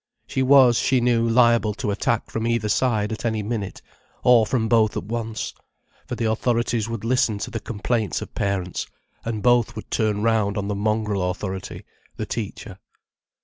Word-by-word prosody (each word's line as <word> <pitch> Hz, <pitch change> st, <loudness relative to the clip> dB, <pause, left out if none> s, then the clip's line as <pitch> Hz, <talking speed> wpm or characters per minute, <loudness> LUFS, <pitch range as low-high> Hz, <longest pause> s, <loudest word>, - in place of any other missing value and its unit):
She 130 Hz, -, -2 dB
was, 130 Hz, -3 st, +6 dB
she 130 Hz, -1 st, +2 dB
knew, 120 Hz, -1 st, +2 dB
liable 115 Hz, -3 st, +4 dB
to 105 Hz, -, -2 dB
attack 110 Hz, +3 st, -1 dB
from 115 Hz, +1 st, -2 dB
either 115 Hz, -2 st, 0 dB
side 110 Hz, -2 st, +1 dB
at 110 Hz, -, -5 dB
any 110 Hz, -2 st, -1 dB
minute, 105 Hz, -3 st, -4 dB, 0.4 s
or 120 Hz, -3 st, +5 dB
from 115 Hz, -2 st, 0 dB
both 110 Hz, -2 st, +3 dB
at -, -, -3 dB
once, 110 Hz, +1 st, -4 dB, 0.5 s
for -, -, -3 dB
the 115 Hz, 0 st, -2 dB
authorities 115 Hz, 0 st, 0 dB
would 115 Hz, -2 st, -5 dB
listen 115 Hz, -3 st, +1 dB
to -, -, -5 dB
the 110 Hz, -, -3 dB
complaints 110 Hz, -4 st, -2 dB
of -, -, -8 dB
parents, 95 Hz, -3 st, -2 dB, 0.4 s
and 110 Hz, -3 st, -3 dB
both 120 Hz, -1 st, +3 dB
would 110 Hz, -, -9 dB
turn 105 Hz, -2 st, 0 dB
round 110 Hz, -2 st, +1 dB
on 100 Hz, -1 st, -2 dB
the -, -, 0 dB
mongrel 105 Hz, -2 st, 0 dB
authority, 95 Hz, +1 st, -5 dB, 0.3 s
the -, -, -4 dB
teacher. 105 Hz, -3 st, -6 dB
110 Hz, 175 wpm, -23 LUFS, 105-120 Hz, 0.5 s, was